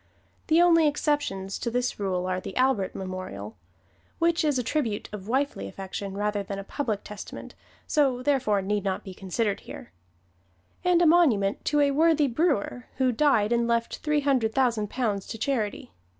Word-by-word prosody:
The 330 +2 +5
only 330 -3 +5
exceptions 290 -10 -1
to 235 - -2
this 245 0 -1
rule 185 -3 -1
are 185 0 -1
the 190 - -7
Albert 255 -7 +1
Memorial 185 - -6 0.6
which 335 0 +2
is 295 -3 +2
a 250 - 0
tribute 235 -5 -1
of 200 -1 -7
wifely 275 +5 -1
affection 195 0 -6
rather 205 0 0
than 200 0 -5
a 195 - -5
public 215 -3 -3
testimonial, 210 - -9 0.3
so 270 -5 +1
therefore 250 -9 +1
need 205 +1 -1
not 190 -2 -2
be 190 - -8
considered 195 +3 -2
here - - -11 0.9
and 355 -1 +4
a - - +5
monument 270 - +3
to 295 0 +2
a 285 -1 +3
worthy 310 +1 +4
brewer 255 - 0
who 260 -1 +2
died 240 -4 +2
and 235 0 +2
left 235 0 0
three 300 -1 0
hundred 255 -6 +1
thousand 235 -6 +1
pounds 210 -6 -2
to 225 - -6
charity. 220 - -2
235 Hz, 170 wpm, -26 LUFS, 200-290 Hz, 0.9 s, The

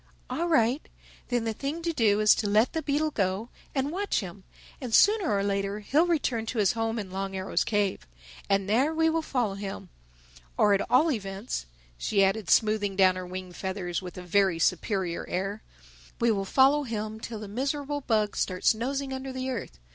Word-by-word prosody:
"All 340 - -1
right. 265 -3 +3 0.5
Then 245 -2 0
the 225 -1 -1
thing 290 +8 -4
to 335 0 -1
do 215 -7 +3
is 215 - +7
to 210 - -1
let 215 +4 +3
the 320 - -1
beetle 305 +1 0
go—and 225 +7 -2
watch 400 - -1
him; 190 0 -9 0.4
and 245 -4 0
sooner 410 -3 +5
or 200 -1 +1
later 200 +1 -1
he'll 300 +11 +2
return 255 -9 0
to 240 - -4
his 205 -1 +4
home 225 -1 -2
in 200 -4 -5
Long 195 0 -4
Arrow's 190 0 0
cave. 205 - -1 0.4
And 195 -1 +2
there 265 +10 +2
we 320 0 +3
will 325 0 0
follow 245 -9 -1
him—Or - - -3
at 200 - +2
all 310 +6 +4
events," 195 - -4 0.3
she 200 - +2
added 195 0 0
smoothing 215 -3 +3
down 190 -1 +5
her 185 -1 -6
wing 185 0 -6
feathers 190 -1 -3
with 180 -1 -9
a 180 - -7
very 190 -1 +2
superior 180 0 0
air, 195 +4 -3 0.6
"we 235 0 +3
will 195 -2 -1
follow 270 +7 +4
him 220 -4 -4
till 225 -1 -6
the 210 - -7
miserable 280 +6 -2
bug 215 -5 0
starts 185 +3 +2
nosing 265 +4 -3
under 265 0 -5
the 260 0 -3
earth. 205 - -5
215 Hz, 185 wpm, -27 LUFS, 195-265 Hz, 0.6 s, is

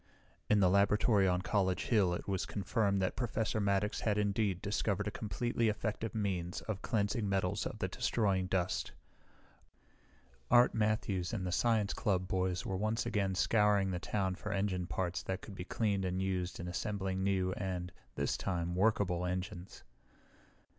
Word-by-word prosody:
In 105 - +5
the 95 - +5
laboratory 100 +1 +4
on 90 0 +1
College 95 -1 +1
Hill 100 -7 +3
it - - -7
was 95 -2 -1
confirmed 100 0 0
that 95 - -1
Professor 115 -2 -1
Maddox 100 +1 +1
had 105 -2 0
indeed 100 -2 +1
discovered 105 0 -1
a - - -1
completely 115 +3 -1
effective 110 +1 -3
means 95 -4 -2
of 105 -3 -4
cleansing 105 -1 0
metals 95 -2 0
of - - -7
the - - -1
destroying 95 -5 0
dust. 90 -2 -1 1.6
Art 120 +1 +6
Matthews 105 -3 0
and 95 -5 -2
the 90 - -2
science 110 +1 +2
club 90 -3 0
boys 90 -1 -1
were 95 - -2
once 110 +4 0
again 100 -5 0
scouring 100 0 +3
the 90 - -2
town 95 0 -1
for 105 +2 -5
engine 95 -3 -1
parts 90 -1 -2
that 95 +1 -4
could 105 - -9
be 90 -2 -6
cleaned 100 -2 0
and 90 0 -1
used 95 -1 -2
in 90 - -5
assembling 95 0 -2
new 95 -1 +1
and, 90 -2 -3 0.2
this - - 0
time, 85 -2 -2
workable 95 -2 +2
engines. 90 +1 -4
100 Hz, 160 wpm, -34 LUFS, 90-105 Hz, 1.6 s, Art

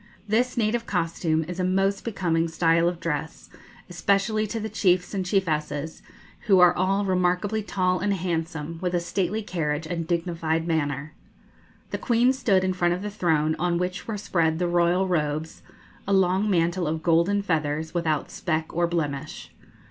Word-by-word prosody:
This 245 +4 +1
native 230 +1 0
costume 165 -3 0
is 180 +3 -7
a - - +1
most 195 +2 +1
becoming 170 -7 0
style 165 +1 +2
of 175 -1 -6
dress, 160 -1 -4 0.4
especially 200 +4 +1
to 225 +2 -3
the 220 - -3
chiefs 185 -4 +1
and 195 -2 -1
chiefesses, 160 -5 -1 0.5
who 195 -3 +6
are 180 -1 +6
all 195 +3 +1
remarkably 185 +3 +1
tall 185 -3 0
and 205 +1 0
handsome, 165 -3 -3
with 180 -1 -1
a - - +3
stately 190 +4 -2
carriage 160 -5 -2
and 165 -1 -4
dignified 165 -2 -1
manner. 150 -2 -2 0.8
The - - -3
Queen 245 +1 +3
stood 200 -8 +2
in 185 0 +1
front 175 -1 +1
of 185 - -7
the 210 - -4
throne, 160 -6 +1
on 175 0 +1
which 180 +1 -3
were 220 -2 -3
spread 165 -5 0
the 175 +1 0
royal 175 +2 +2
robes, 155 -2 -2 0.5
a 200 - +1
long 190 +2 +3
mantle 175 -1 +1
of 160 +1 -2
golden 170 +5 +2
feathers, 160 -3 -1
without 160 -4 -1
speck 160 -2 -2
or 170 0 +2
blemish. 155 -3 -4
175 Hz, 165 wpm, -25 LUFS, 160-195 Hz, 0.8 s, who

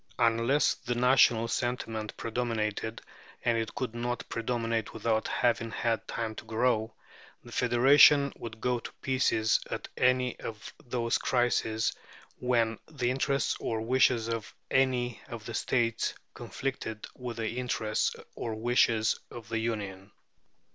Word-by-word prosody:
Unless 115 +4 +3
the 120 - -4
national 120 -2 +4
sentiment 115 -3 -3
predominated 110 -2 -2 0.4
and 120 -1 +3
it 110 -1 -4
could 125 -4 -3
not 120 0 -3
predominate 115 -2 -2
without 110 0 0
having 115 -1 +1
had 115 -1 -1
time 115 -1 -3
to 110 - -9
grow 110 0 0 0.5
the 120 - -13
federation 135 +4 +6
would 110 -1 -8
go 125 +1 0
to - - -8
pieces 125 -4 +2
at - - -4
any 125 0 +2
of 110 -2 -7
those 120 -1 0
crises 120 -3 +1 0.5
when 115 -3 +1
the 125 -6 -1
interests 135 0 0
or 115 - -2
wishes 120 -1 +3
of 115 -1 -4 0.2
any 125 -2 +1
of 115 -4 -8
the 115 - -6
states 115 0 0 0.2
conflicted 120 -5 -5
with 125 -2 -6
the 110 -1 -2
interests 110 -3 0 0.2
or 115 -2 -4
wishes 115 -1 +2
of 115 -2 -10
the 115 -1 -1
Union. 100 -4 -4
115 Hz, 135 wpm, -29 LUFS, 110-125 Hz, 0.5 s, federation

